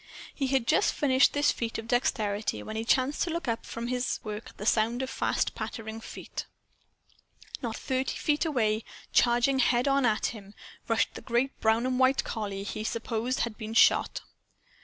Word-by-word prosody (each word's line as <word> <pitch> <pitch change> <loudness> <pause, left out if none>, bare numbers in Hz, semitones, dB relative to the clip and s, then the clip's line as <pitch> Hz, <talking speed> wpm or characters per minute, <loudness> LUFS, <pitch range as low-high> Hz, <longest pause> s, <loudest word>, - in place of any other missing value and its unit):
He 275 - -1
had 265 -3 +1
just - - +3
finished 265 -2 +4
this 290 0 +3
feat 230 -1 -3
of 225 - -6
dexterity 215 -4 0
when 215 - -6
he 220 - -2
chanced 260 +4 +1
to - - +1
look 335 -3 -3
up 230 -1 -2
from 230 +1 -5
his 250 +1 -1
work 215 +1 -6
at 205 - -4
sound 235 +4 +2
of 260 - -4
fast - - 0
pattering 225 -1 -6
feet. - - -7 1.1
Not 230 -3 -3
thirty 260 +1 -2
feet 295 +1 +1
away, 225 -9 +1 0.3
charging 245 +3 +3
head 245 +1 +3
on 275 0 +3
at 215 -1 +1
him, 205 -2 -12 0.3
rushed - - +1
the - - -8
great 250 +3 -1
brown 220 +2 +3
and 255 0 0
white 260 +1 +4
collie 200 -3 -4
he 215 +1 -4
supposed 230 +2 -2
had 235 -1 -3
been 220 0 -5
shot. - - +4
235 Hz, 180 wpm, -28 LUFS, 220-260 Hz, 1.1 s, finished